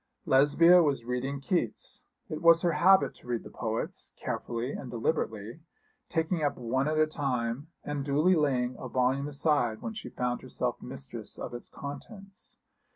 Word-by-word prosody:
Lesbia 165 +5 +6
was 140 -7 +1
reading 130 +3 -2
Keats. 175 +6 -2 0.2
It 155 -6 -5
was 170 0 +6
her 175 - +3
habit 190 +3 +5
to - - -18
read 120 -2 -2
the - - -11
poets, 110 -1 -4
carefully 120 +2 -3
and 130 - -6
deliberately, 115 -1 -2 0.5
taking 165 0 0
up 145 -1 0
one 130 +3 0
at 155 0 0
a 155 - +5
time, 135 -3 -2 0.2
and 145 -1 -3
duly 150 +6 +3
laying 130 -6 +1
a 130 - -6
volume 130 +3 +1
aside 145 -6 +1
when 225 - -3
she 215 - -7
found 125 -1 -2
herself - - -3
mistress - - -7
of - - -6
its 120 - -7
contents. 195 - -9
140 Hz, 160 wpm, -29 LUFS, 125-160 Hz, 0.5 s, Lesbia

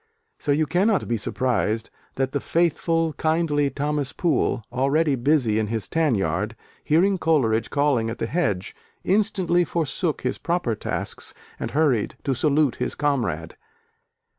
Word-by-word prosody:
So 145 - -1
you 155 +2 +3
cannot 195 +5 +1
be 120 - 0
surprised 115 -1 -1 0.2
that 135 0 -1
the 140 - -1
faithful, 165 0 +1
kindly 155 -3 +1
Thomas 145 -1 -2
Poole, 130 -7 0
already 140 +4 +2
busy 125 -4 +2
in 110 - 0
his 110 -3 -3
tan 160 -6 +2
yard, 95 +4 -1 0.3
hearing 185 +5 +3
Coleridge 125 -10 +2
calling 140 -6 +1
at 115 - -5
the - - -2
hedge, 115 - -1 0.3
instantly 185 -3 +2
forsook 165 -1 -1
his 125 - -2
proper 170 -9 0
tasks 105 - -4 0.2
and - - -3
hurried 140 -8 +1
to 135 - +1
salute 145 +1 +2
his 125 - -2
comrade. 115 - -1
145 Hz, 140 wpm, -24 LUFS, 115-160 Hz, 0.3 s, you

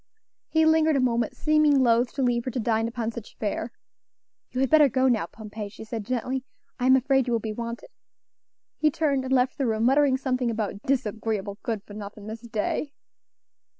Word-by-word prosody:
He 320 0 +3
lingered 315 -1 +4
a - - +3
moment, 235 -3 0
seeming 305 -3 +3
loath 240 0 +3
to 270 - -1
leave 240 -1 +1
her - - -1
to 255 - -3
dine 225 -1 +1
upon 230 -1 -3
such 230 -2 -10
fare. 220 +2 -3 0.8
"You 255 - -4
had 270 - +1
better 305 -3 +7
go 260 +2 +2
now, 225 -9 +1
Pompey," 210 +1 -8
she 215 - -11
said 220 -2 -6
gently; 255 +1 -2 0.4
"I 250 - +1
am 260 - +7
afraid 265 0 +2
you 240 - 0
will 230 - +2
be 220 0 -4
wanted." 235 +1 -6 0.9
He 310 - +4
turned 290 -3 0
and 260 - -4
left 255 0 +2
the 270 - +1
room, 220 0 0
muttering 270 +1 +4
something 255 -2 -1
about 215 -3 -3
"disagreeable, 220 -5 -1
good 225 -5 -3
for 205 - -13
nothing 205 0 -8
Miss 220 +1 -7
Day!" 235 +5 -2
240 Hz, 195 wpm, -26 LUFS, 220-265 Hz, 0.9 s, better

